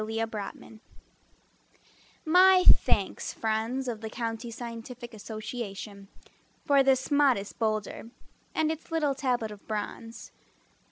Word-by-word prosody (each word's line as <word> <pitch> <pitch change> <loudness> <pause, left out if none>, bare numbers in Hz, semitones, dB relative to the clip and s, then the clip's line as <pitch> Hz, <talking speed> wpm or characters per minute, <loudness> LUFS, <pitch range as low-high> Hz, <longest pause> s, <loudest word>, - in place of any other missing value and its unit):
Perry 220 +1 -4
Zoll 220 0 -5 1.5
My 365 +3 +6
thanks, - - +4
friends 225 +4 -1
of 225 -3 -4
the 220 - -5
County 230 +1 -4
Scientific 235 +1 -8
Association, 215 -2 -7 0.6
For 280 -1 +5
this 265 +1 +2
modest 265 -9 +2
boulder, 215 0 -2 0.5
And 315 0 +2
its 320 +1 -7
little 305 -4 +1
tablet 250 -5 -1
of 205 -1 -12
bronze. 220 +2 -5
230 Hz, 110 wpm, -28 LUFS, 220-270 Hz, 1.5 s, My